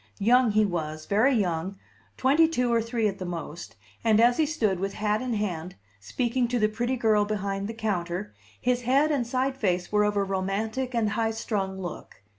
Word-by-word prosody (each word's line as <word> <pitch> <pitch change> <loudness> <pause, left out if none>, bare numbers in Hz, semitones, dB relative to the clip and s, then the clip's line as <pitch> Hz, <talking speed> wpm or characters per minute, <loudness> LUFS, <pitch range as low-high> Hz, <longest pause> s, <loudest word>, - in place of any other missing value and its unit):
Young 245 +4 +4
he 215 0 +4
was, 155 -4 -3
very 230 +7 +3
young, 185 -2 -1 0.4
twenty 290 +5 +4
two 250 -7 0
or 230 - +3
three 230 -1 0
at 195 -1 -4
the - - -4
most, 170 -7 -6 0.3
and 220 -2 +4
as 240 +1 +5
he 315 - +2
stood, 215 - 0
with 195 +1 -2
hat 210 +1 0
in 250 -3 -2
hand, 180 -4 -3 0.2
speaking 240 - -1
to 245 +1 -1
the 215 -2 +3
pretty 240 +4 -2
girl 220 -4 +3
behind 200 -1 -2
the 225 - -5
counter, 195 -3 -3 0.3
his 250 0 +1
head 275 +5 +3
and 260 -6 0
side 260 +2 0
face 180 -8 -1
were 210 0 +3
of 210 0 +1
a 200 - +2
romantic 210 +7 -2
and 220 -3 +1
high 225 +1 0
strung 200 -4 -3
look. 175 - -8
215 Hz, 200 wpm, -26 LUFS, 190-240 Hz, 0.4 s, as